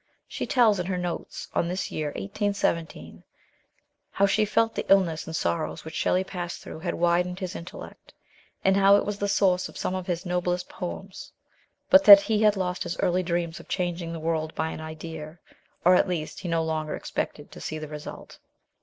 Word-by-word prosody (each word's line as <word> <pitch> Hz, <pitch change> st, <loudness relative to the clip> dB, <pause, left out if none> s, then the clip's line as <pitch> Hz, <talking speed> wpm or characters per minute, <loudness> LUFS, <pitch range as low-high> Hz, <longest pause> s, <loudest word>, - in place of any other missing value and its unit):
She -, -, -4 dB
tells, 225 Hz, -6 st, +4 dB
in 180 Hz, -, -2 dB
her 185 Hz, -1 st, -1 dB
notes 175 Hz, -1 st, -5 dB
on 170 Hz, -, +1 dB
this 180 Hz, +2 st, -3 dB
year 155 Hz, -1 st, -2 dB
1817, 165 Hz, -, -2 dB, 0.9 s
how 200 Hz, -, +2 dB
she 210 Hz, +2 st, +2 dB
felt 225 Hz, +2 st, +1 dB
the -, -, -2 dB
illness 175 Hz, -5 st, +3 dB
and 160 Hz, -, -5 dB
sorrows 85 Hz, -, -2 dB
which 160 Hz, -, -8 dB
Shelley 185 Hz, +3 st, +1 dB
passed 175 Hz, -2 st, -5 dB
through -, -, -8 dB
had 175 Hz, +1 st, -3 dB
widened 175 Hz, +1 st, +1 dB
his 185 Hz, 0 st, -5 dB
intellect, 170 Hz, +2 st, -10 dB, 0.5 s
and 190 Hz, 0 st, +5 dB
how 195 Hz, 0 st, +6 dB
it 205 Hz, -, +2 dB
was 205 Hz, 0 st, -3 dB
the 205 Hz, -, 0 dB
source 185 Hz, -2 st, +2 dB
of -, -, -12 dB
some -, -, -2 dB
of 185 Hz, -1 st, -4 dB
his 175 Hz, +1 st, -2 dB
noblest 180 Hz, 0 st, -1 dB
poems, 185 Hz, +2 st, -7 dB, 0.6 s
but 285 Hz, +1 st, +8 dB
that 200 Hz, -2 st, +12 dB
he 210 Hz, +1 st, 0 dB
had 210 Hz, -1 st, +5 dB
lost 180 Hz, -1 st, -2 dB
his 170 Hz, -, -3 dB
early 180 Hz, +1 st, +1 dB
dreams 170 Hz, -2 st, -2 dB
of -, -, -14 dB
changing 175 Hz, -2 st, -2 dB
the 165 Hz, -, -5 dB
world 160 Hz, -1 st, -2 dB
by 160 Hz, 0 st, -1 dB
an -, -, -7 dB
idea, 155 Hz, 0 st, -8 dB, 0.5 s
or, 180 Hz, -, +7 dB
at 180 Hz, -, +4 dB
least, 165 Hz, -4 st, -3 dB
he 185 Hz, -, -6 dB
no 165 Hz, -1 st, +1 dB
longer 155 Hz, -1 st, -2 dB
expected -, -, -5 dB
to -, -, -11 dB
see 155 Hz, -, -4 dB
the 155 Hz, 0 st, -6 dB
result. 150 Hz, 0 st, -9 dB
180 Hz, 200 wpm, -26 LUFS, 160-195 Hz, 0.9 s, that